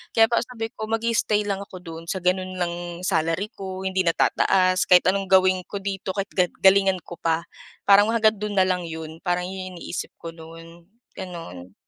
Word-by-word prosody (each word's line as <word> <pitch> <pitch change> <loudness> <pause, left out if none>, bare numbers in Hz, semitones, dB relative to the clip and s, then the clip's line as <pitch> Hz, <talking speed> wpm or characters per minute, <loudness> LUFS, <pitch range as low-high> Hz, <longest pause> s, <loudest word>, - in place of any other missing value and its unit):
Kaya 225 0 +6
parang 235 0 +1
sabi 225 -3 -5
ko, 220 - -6
mag-i-stay 225 -1 +1
lang 200 -1 -1
ako 195 - -11
do’n 165 -1 -8
sa 190 - -2
gano'n 185 +1 0
lang 175 -1 -1 0.3
salary 165 +3 0
ko, 190 -3 -7
hindi 190 0 -1
na 165 - +3
tataas, 185 -1 +2
kahit 180 -1 +7
anong 195 0 -2
gawin 185 0 +4
ko 200 - -5
dito, 195 -1 -4
kahit 200 0 -3
ga 180 -2 +3 0.2
galingan 190 -1 +5
ko 175 0 -10
pa. 165 0 0 0.4
Parang, 205 +1 +7
hanggang 220 -1 +3
do'n 210 0 -3
na 190 - +5
lang 180 -2 -1
‘yon. 160 0 -7
Parang 180 -1 0
yun 185 -1 -6
yung 180 - -10
iniisip 175 - -5
ko 165 - -7
no’n, 165 +1 -13 0.3
gano'n. 95 - -8
185 Hz, 195 wpm, -24 LUFS, 170-200 Hz, 0.4 s, kahit